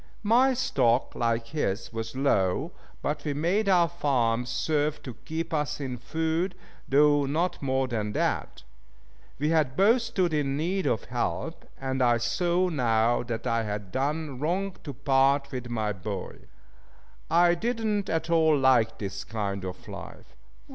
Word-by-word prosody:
My 250 +5 +4
stock, 130 - +1
like 115 -1 -1
his, 115 -9 -2
was 115 +2 -5
low, 100 -9 +1 0.3
but 150 0 -2
we 145 -2 -2
made 185 +8 +1
our 175 -3 +5
farms 120 -6 0
serve 150 +2 0
to 125 - -6
keep 160 +7 -5
us 150 -2 -1
in 130 -3 -4
food, 160 - -1 0.3
though 145 0 +4
not 165 +6 -1
more 130 -1 0
than 105 -4 -2
that. - - -1 0.7
We 150 +3 +1 0.2
both 220 - +4
stood 190 -8 0
in 140 -2 0
need 185 +5 -1
of 115 - 0
help, 125 +6 -3
and 130 -1 -2
I 120 -1 +4
saw 175 +9 +1
now 120 -6 +2
that 120 -2 -5
I 115 0 +1
had 105 -3 -5
done 145 +1 -2
wrong 180 +6 -1
to 145 - -5
part 140 +1 +2
with 125 -2 -5
my 110 -3 -1
boy. 100 0 -6 0.9
I 175 +1 +5
did 225 +6 -2
not 205 -2 0
at 165 +1 -1
all 160 -2 +4
like 125 -4 +3
this 100 -1 -5
kind 100 -3 -3
of 90 -1 -7
life. - - -10
140 Hz, 155 wpm, -27 LUFS, 115-165 Hz, 0.9 s, our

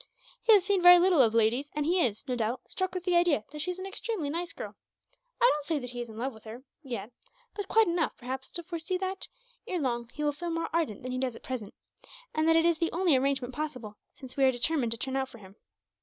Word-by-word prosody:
"He 450 - +6
has 395 -3 +5
seen 395 -2 +2
very 355 0 +10
little 350 -4 +5
of 225 -2 +3
ladies; 235 +6 +2
and 300 -1 0
he 350 +2 +3
is, 215 -3 -1
no 250 - -1
doubt, 240 +2 -1
struck 375 -1 -2
with 365 - -3
the 360 -1 +1
idea 345 -10 +3
that 300 - -7
she 310 - -1
is 360 - -3
an 375 - -6
extremely 390 -5 -3
nice 340 +2 -3
girl. - - -7 0.7
I - - -1
don't 295 - -3
say 315 +1 0
that 250 -3 -5
he 245 0 -5
is 240 - -6
in 220 - -10
love 255 +3 -2
with 220 0 -16
her, 230 +4 -9 0.2
yet; 235 -6 -6 0.4
but 410 -2 -5
quite 445 +2 +5
enough, 340 -3 0
perhaps, 260 +1 -5
to 345 - -1
foresee 340 +1 -3
that, 380 +1 -4 0.4
ere 365 - -2
long, 240 -4 -2
he 300 - -5
will 295 - +2
feel 345 +4 -5
more 330 0 -2
ardent 315 -12 -1
than 255 - -4
he 255 - -2
does 255 -3 -2
at - - -13
present; 235 -6 -5 0.6
and 310 +1 +1
that 325 - +5
it 330 0 +4
is 340 -2 +2
the 335 - 0
only 345 -3 +3
arrangement 265 -1 0
possible, 250 -8 -5 0.2
since 260 -1 -11
we 275 - +1
are 265 - +6
determined 250 0 +2
to - - -7
turn 265 +3 -2
out 265 -1 -1
for - - -13
him. 195 -2 -15
290 Hz, 260 wpm, -29 LUFS, 245-345 Hz, 0.7 s, very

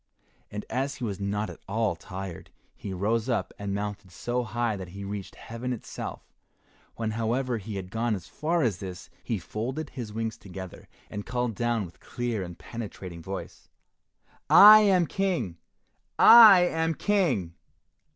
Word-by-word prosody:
And 105 0 -6
as 135 +2 -2
he 140 - -8
was 100 -4 -3
not 105 +2 -2
at - - -12
all 110 -2 0
tired, 95 0 -8 0.3
he 100 - -7
rose 110 +6 0
up 120 - -1
and 100 -1 -4
mounted 105 -1 -4
so 120 +7 -2
high 120 -1 -1
that 95 -2 -7
he 100 +3 -9
reached 100 -1 -6
heaven 120 +2 -6
itself. 120 - -6 0.7
When, 110 -1 -2
however, 115 +2 -1
he 105 +1 -7
had 95 -1 -6
gone 115 0 0
as 95 -2 -8
far 165 +1 0
as 100 -7 0
this, 95 -1 -8
he 115 - -2
folded 130 - -5
his 120 -5 -6
wings 110 0 -3
together, 95 -2 -9 0.2
and 105 - -5
called 125 0 -2
down 120 -1 -1
with 85 - -14
clear 120 -4 -3
and 85 -2 -7
penetrating 95 -7 -8
voice, 95 +2 -8 0.8
"I 215 +1 +10
am 190 -4 +4
King! 175 - -1 0.6
I 220 -6 +10
am 165 -2 +1
King." 145 - +1
110 Hz, 160 wpm, -27 LUFS, 100-125 Hz, 0.8 s, I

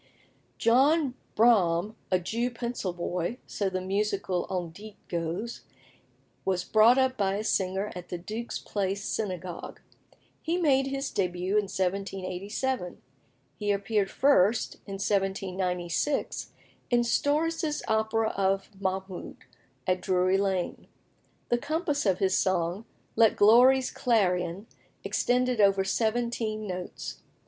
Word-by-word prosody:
John 270 +4 +3 0.2
Braham, 210 -4 +3
a 185 - +3
Jew 230 +7 -1
pencil 235 -5 -3
boy 175 +4 -3
so 200 -2 -2
the 185 0 -3
musical 195 -2 -1
on 180 -3 -3
dit 205 +4 -11
goes 170 +7 -3 0.8
was 185 -2 0
brought 220 +6 +5
up 260 -1 +2
by 195 -1 +1
a 210 - -2
singer 190 0 0
at 180 -1 -8
the 175 - -3
Duke's 215 +7 -5
Place 200 -1 -2
Synagogue. 185 -4 -4 0.6
He 335 +2 -1
made 270 -6 +3
his 275 0 -3
début 180 -1 -1
in 210 -1 +2
1787. 195 +3 -2 0.6
He 205 - -2
appeared 200 0 0
first, 230 -5 +3
in 195 - -6
1796, 190 - -1 0.4
in 240 -1 +4
Storace's 300 +5 0
opera 220 0 +1
of 195 0 0
"Mahmoud," 190 -1 -4 0.5
at 185 0 +1
Drury 185 +1 +2
Lane. 190 -3 -1 0.6
The 240 - +2
compass 295 - -1
of 190 -2 +3
his 190 -1 +2
song, 185 +2 0 0.3
"Let 225 -2 +5
Glory's 250 +5 +6
Clarion," 185 -5 +1 0.4
extended 250 -2 +1
over 195 -1 +4
seventeen 220 +1 -1
notes. 180 -2 -6
200 Hz, 120 wpm, -28 LUFS, 185-235 Hz, 0.8 s, Glory's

